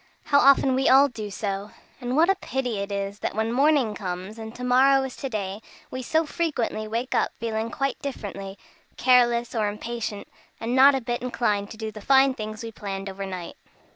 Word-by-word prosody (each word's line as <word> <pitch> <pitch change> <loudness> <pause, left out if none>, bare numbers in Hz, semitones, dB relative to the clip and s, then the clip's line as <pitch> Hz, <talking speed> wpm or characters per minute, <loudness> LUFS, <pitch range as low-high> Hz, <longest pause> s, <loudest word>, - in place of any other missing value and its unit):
How 285 - +4
often 275 -1 +5
we 265 +1 +2
all 275 +2 +7
do 215 -4 -6
so! 200 0 -4 0.3
And 250 0 -3
what 325 +3 +5
a 390 - +5
pity 260 - -3
it 200 +1 -4
is 200 0 -3
that - - -3
when 220 +1 0
morning 270 -3 +3
comes 190 +2 -6
and 220 0 -7
to 250 - -7
morrow 265 +2 +4
is 265 -1 -5
to 270 - -4
day, 200 -2 -4 0.3
we 255 - -4
so 320 +6 +1
frequently 280 -10 -2
wake 230 +4 -3
up - - +1
feeling 225 0 -2
quite 275 +3 -2
differently; 200 -7 -6 0.4
careless 240 -2 +3
or 220 -3 +1
impatient, 215 -1 -5 0.3
and 230 +2 -2
not 275 +1 +7
a 265 - -1
bit 240 0 -3
inclined 210 -5 -1
to 220 - -10
do 220 -1 -4
the 215 0 -10
fine 270 +3 +5
things 215 -2 -6
we 230 - -6
planned 195 -2 -5
overnight. 190 -2 -6
230 Hz, 200 wpm, -25 LUFS, 205-265 Hz, 0.4 s, all